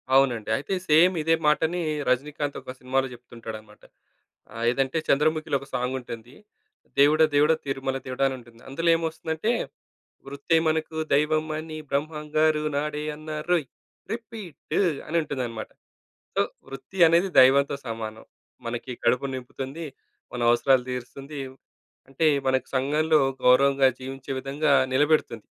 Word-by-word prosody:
అవునండి. 120 -6 +3
అయితే, 145 +7 -4 0.2
సేమ్ 170 +5 +6
ఇదే 165 +1 +3
మాటనీ 160 +3 +2 0.3
'రజనీకాంత్' 145 +3 -1
ఒక 130 - -8
సినిమాలో 135 +1 0
చెప్తుంటాడనమాట. 115 -3 -11 0.7
ఆహ్, 115 +1 -3
ఏదంటే 135 +3 0
చంద్రముఖిలో 155 0 +2
ఒక 140 - -12
సాంగుంటుంది. 125 -1 -4 0.6
'దేవుడా 155 +3 +6
దేవుడా 150 +3 +5
తిరుమల 135 -1 -2
దేవుడా' 130 +1 +1
అనుంటుంది. 120 -3 -10
అందులేమొస్తుందంటే, 165 - 0 0.7
వృత్తే 140 +4 0
మనకు 160 0 -2 0.2
దైవం 155 +2 +2
అని 155 0 -7
బ్రహ్మంగారు 150 +1 0
నాడే 150 0 -2
అన్నారోయ్! 155 +1 -1 0.5
రిపీట్టు 225 -7 -4 0.3
అనుంటుందనమాట. 135 -8 -2 0.7
సో, - - +4 0.3
వృత్తి 135 +8 -10
అనేది 175 +3 +3
దైవంతో 140 +2 +5
సమానం. 110 -1 -6 0.4
మనకి 120 +2 -4
కడుపు 125 +2 +2
నింపుతుంది, 135 +5 -6 0.5
మన 120 - -4
అవసరాలు 125 +1 +3
తీరుస్తుంది. 135 +4 -6 0.7
అంటే, 135 +4 0 0.2
మనకు 130 0 0
సంఘంలో 150 +4 +2 0.2
గౌరవంగా 135 +1 +5
జీవించే 135 +1 -6
విధంగా 140 +2 +1 0.2
నిలబెడుతుంది. 145 -6 +2
140 Hz, 110 wpm, -25 LUFS, 130-155 Hz, 0.7 s, సేమ్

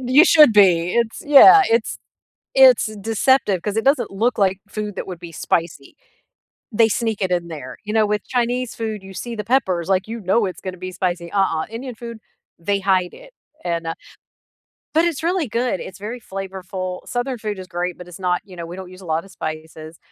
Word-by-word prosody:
You 280 +7 +7
should 305 -9 +7
be, 180 -4 +4
it's 235 -1 0
yeah. 375 +8 +9
It's 230 -1 +1 0.6
it's, - - +6
eh, 215 - -9
deceptive 220 -3 +2
'cause 210 0 -3
it 225 - 0
doesn't 275 +2 +2
look 225 +5 0
like 190 -1 +2
food 210 -1 -5
that - - -5
would 180 -3 -7
be 170 -1 -10
spicy; 165 -3 -2 0.8
they 225 +1 +4
sneak 225 -1 -1
it 190 - 0
in 170 -1 -1
there. 145 -6 -8
You 210 - -4
know, 220 -1 +3
with 210 -1 -2
Chinese 245 0 -1
food, 220 -3 -4
you 190 0 -11
see 235 +4 -5
the 210 - -5
peppers, 190 -8 0
like, 190 +1 +1
you 230 0 -5
know 195 +4 +2
it's 185 - -6
gonna 185 -1 -6
be 185 +1 -7
spicy. 175 -2 -3
Uh-uh, 190 -5 +1
Indian 245 +2 -6
food; 235 -1 -8 0.4
they 200 +4 0
hide 190 -2 +1
it - - -15 0.3
and, 170 -1 -2
uh 165 - -2 1.0
but 325 +2 +3
it's 325 -3 -2
really 350 -3 0
good, 235 -4 -1
it's 185 - -8
very 225 +5 -6
flavorful. 190 -1 -6
Southern 245 0 -3
food 210 -2 -4
is 185 - -8
great, 175 0 -3
but 180 0 -11
it's 180 +1 -11
not, 180 -1 0
you 185 - -13
know, 170 -1 -6
we 175 - -8
don't 185 -1 -9
use 185 +1 -13
a 180 - -12
lotta 160 +3 -1
spices. 155 -2 -7
195 Hz, 210 wpm, -21 LUFS, 180-235 Hz, 1.0 s, yeah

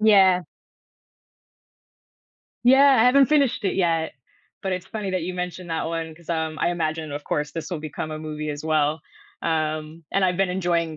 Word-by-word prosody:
Yeah. 195 -4 +6 2.2
Yeah, 270 +2 +7
I 225 - +5
haven't 270 +1 +6
finished 280 -8 +2
it 190 - +1
yet, 165 -3 +1 0.5
but 190 - -1
it's 180 0 -4
funny 205 -1 -4
that 185 -2 -1
you 180 +2 -4
mentioned 180 -1 -5
that 160 - -1
one 165 -1 -4
'cause, 170 +1 -20
um, 160 -1 -2
I 170 - +2
imagine, 160 -2 -2
of 145 0 -5
course, 150 0 -1
this 165 +2 -6
will 165 -4 -3
become 155 0 -5
a 155 - -5
movie 155 -1 -4
as 145 +1 -6
well, 155 0 +1 0.4
um, 155 0 -2
and 195 -1 +3
I've 180 -1 +1
been 195 0 +2
enjoying 170 -3 0
170 Hz, 180 wpm, -24 LUFS, 155-190 Hz, 2.2 s, Yeah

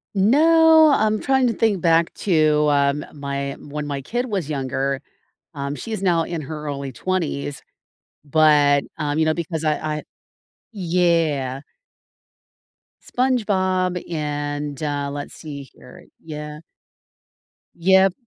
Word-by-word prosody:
No, 315 +8 +6
I'm 215 -4 +2
trying 265 -1 +2
to 230 - 0
think 210 -5 +1
back 165 -1 +3
to, 155 -5 +2
um, 140 +1 +1
my 140 -1 -4
when 150 +1 -6
my 140 -1 -4
kid 240 - -2
was 195 - -3
younger 135 -1 -2 0.5
um, 140 0 -4
she's 220 +4 -5
now 175 -4 +2
in 165 -2 -4
her 150 +1 -7
early 140 -2 -4
20s, 150 -5 -3 0.7
but, 145 -1 +4
um, 150 -1 -2
you - - +4
know, 155 - +2
because 160 -1 -4
I 155 -1 +2 0.2
I - - -7 0.7
Yeah. 165 -8 0 1.4
SpongeBob 190 -8 0
and, 145 -1 -3
uh 145 -1 -2
Let's 145 0 -6
see 145 -3 -8
here. 125 -1 -16 0.2
Yeah. 150 -1 -7 1.2
Yep. 190 +2 +4
155 Hz, 120 wpm, -22 LUFS, 145-185 Hz, 1.4 s, No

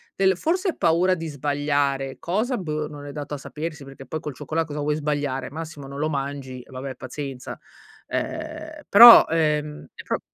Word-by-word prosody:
del 190 -2 +3
forse 365 - 0
è - - -3
paura 175 +2 +3
di 165 -2 -6
sbagliare, 145 -2 -1
cosa 220 +9 -1
boh 155 -3 -3
non 145 -1 -10
è - - -6
dato 145 0 -6
a - - -2
sapersi, 150 +1 -6
perché 135 0 -12
poi 155 - -4
col 150 -3 -7
cioccola 165 +1 -2
cosa 150 -2 -6
vuoi 150 +1 0
sbagliare? 145 -4 -2
Massimo 155 -2 -8
non 140 0 -8
lo 155 +2 0
mangi, 135 -3 -4
vabbè, 130 +1 -6
pazienza, 130 0 -7 0.5
ehm, 310 -1 -5
però, 235 +3 +10
ehm, 150 -2 -1
è - - -10
pro - - -2
150 Hz, 180 wpm, -24 LUFS, 140-170 Hz, 0.5 s, però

